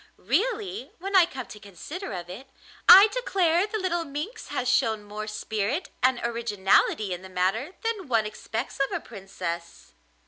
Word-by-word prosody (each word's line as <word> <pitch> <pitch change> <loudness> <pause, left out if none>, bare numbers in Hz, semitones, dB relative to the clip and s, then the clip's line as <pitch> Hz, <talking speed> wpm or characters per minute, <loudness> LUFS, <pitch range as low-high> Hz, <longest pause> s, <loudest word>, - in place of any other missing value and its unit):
Really, 400 - -1
when 390 +3 -4
I 360 -3 +7
come 260 -7 -7
to 210 - -11
consider 210 - -8
of 175 -2 -6
it, 205 +10 -9 0.4
I 395 +3 +11
declare 385 -6 +1
the 435 - -3
little 355 -4 -1
minx 300 - -6
has 255 - -3
shown 220 -4 +2
more 210 +1 -6
spirit 215 - -2
and 255 -1 +3
originality 210 -3 +1
in 180 - -6
the 190 - -11
matter 195 - -1
than 440 -6 -2
one 225 -4 +2
expects 220 +4 -5
of 275 - +1
a - - -1
princess. 180 -5 -7
245 Hz, 165 wpm, -26 LUFS, -, 0.4 s, I